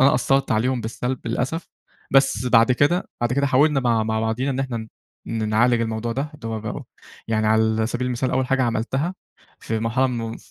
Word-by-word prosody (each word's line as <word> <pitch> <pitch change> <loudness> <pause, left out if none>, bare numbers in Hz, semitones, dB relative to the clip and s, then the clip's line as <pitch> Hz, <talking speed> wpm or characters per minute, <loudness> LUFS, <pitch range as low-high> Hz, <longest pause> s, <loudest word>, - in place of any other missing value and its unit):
أنا 135 0 +5
أثّرت 135 +2 +1
عليهم 125 +3 +1
بالسلب 125 +3 -3
للأسف، 130 +8 -2 0.4
بس 135 -2 +3
بعد 115 +1 +5
كده، 145 +8 +1
بعد 120 0 0
كده 140 +2 +2
حاولنا 140 +2 +3
مع 115 -3 +2
مع 110 0 -1
بعضينا 115 +5 -1
إن 130 - -2
إحنا 130 -3 -3 0.5
ن 110 -2 -2
نعالج 120 +2 +3
الموضوع 115 0 -2
ده، 140 +5 -3
اللي 140 -6 -9
هو 110 -1 -3
بقى 110 - -5
أهو، - - -7 0.4
يعني 110 -1 +1
على 110 0 +2
سبيل 120 +2 -2
المثال 125 +1 -1
أول 130 0 +1
حاجة 135 0 +1
عملتها 130 +9 -1 0.5
في 110 - -2
مرحلة 115 +4 +1
من 115 -2 -4
120 Hz, 195 wpm, -22 LUFS, 115-135 Hz, 0.5 s, أنا